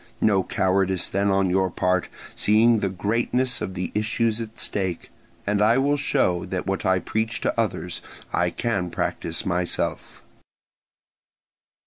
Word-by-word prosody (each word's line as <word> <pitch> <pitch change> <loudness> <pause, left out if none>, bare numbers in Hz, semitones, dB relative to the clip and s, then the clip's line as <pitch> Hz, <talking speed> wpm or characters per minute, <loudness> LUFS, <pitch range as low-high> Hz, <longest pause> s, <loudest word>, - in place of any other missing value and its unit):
No 100 -3 +3
cowardice 95 -1 +1
then 100 +1 0
on 95 -1 +2
your 95 0 +2
part, 90 +1 0 0.3
seeing 110 +2 +4
the 100 - 0
greatness 115 +6 0
of 95 - -4
the 90 -1 -3
issues 110 +1 0
at 115 -1 -8
stake, 95 -4 -2 0.3
and 105 0 +1
I 110 +3 +5
will 140 +2 +3
show 90 -10 +1
that 95 -1 -3
what 95 -1 -1
I 95 0 +4
preach 110 +4 -2
to - - 0
others - - -2 0.3
I - - +2
can 100 -7 -1
practise 85 -1 -2
myself." 90 -2 -2
100 Hz, 140 wpm, -24 LUFS, 95-110 Hz, 0.3 s, I